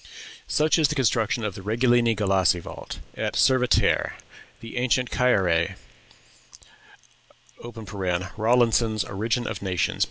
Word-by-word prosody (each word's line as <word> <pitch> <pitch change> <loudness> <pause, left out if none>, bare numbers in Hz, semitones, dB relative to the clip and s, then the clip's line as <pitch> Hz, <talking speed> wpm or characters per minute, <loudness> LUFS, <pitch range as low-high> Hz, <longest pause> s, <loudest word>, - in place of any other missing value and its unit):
Such 155 +2 +2
is 155 - +4
the 150 - -3
construction 115 -3 0
of 105 -2 -2
the 95 - -9
Regulini 120 +2 +2
Galassi 95 -3 +2
vault, - - -9 0.2
at - - -3
Cervetere, 130 -2 +2 0.5
the 115 0 -9
ancient 125 0 0
Cære." 105 -8 +2 2.8
(Rawlinson's 115 -1 +2
"Origin 110 +4 -2
of - - -5
Nations," 95 -3 -1
p. - - -15
115 Hz, 115 wpm, -24 LUFS, 100-125 Hz, 2.8 s, is